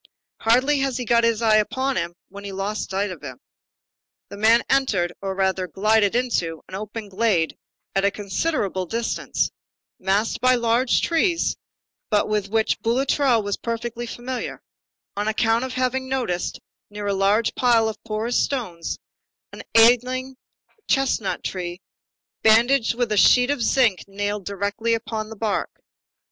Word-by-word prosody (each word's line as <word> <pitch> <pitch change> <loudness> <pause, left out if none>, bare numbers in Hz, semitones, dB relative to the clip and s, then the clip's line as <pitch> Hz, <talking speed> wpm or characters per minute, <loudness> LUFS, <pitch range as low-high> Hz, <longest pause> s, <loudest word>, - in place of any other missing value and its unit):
Hardly 255 +6 +3
had 270 -2 0
he 250 - -4
got 235 +1 +3
his 230 0 +1
eye 215 -1 +5
upon 260 +5 0
him 170 0 -2
when 200 +1 -11
he 200 - -6
lost 195 +2 -3
sight 195 +1 -1
of 175 - -9
him. 130 -4 -8 0.9
The 200 - -9
man 225 +3 +4
entered, 205 -11 +1
or 195 -1 -3
rather, 190 -1 0
glided 210 +4 +2
into, 180 -10 -1
an - - -15
open 210 +2 -6
glade, 195 -5 +1 0.4
at 195 - +1
a 200 - +4
considerable 200 - -2
distance, 230 +5 -1 0.5
masked 195 +4 0
by 255 0 +5
large 240 +1 +2
trees, 335 +1 +1 0.5
but 210 -2 +2
with 210 -2 -1
which 220 +1 +1
Boulatruelle 255 0 +2
was 205 0 -2
perfectly 235 +1 -4
familiar, 245 +2 -5 0.5
on 205 +1 -2
account 225 +2 +1
of 260 - -6
having 260 +1 -1
noticed, 240 -10 -2 0.3
near 205 0 -6
a 200 - 0
large 200 +3 +2
pile 235 -3 +3
of 220 0 -6
porous 225 +2 -1
stones, 185 -12 -3 0.6
an - - -8
ailing 250 +3 +4 0.5
chestnut 270 -6 0
tree 175 -1 -4 0.6
bandaged 230 +2 +4
with 240 -2 -1
a 210 - +1
sheet 250 +6 +5
of 285 -4 -2
zinc 230 -4 +2
nailed 205 0 -3
directly 205 +4 -1
upon 220 -1 -4
the 220 - -8
bark. 215 -1 -1
220 Hz, 150 wpm, -23 LUFS, 200-245 Hz, 0.9 s, eye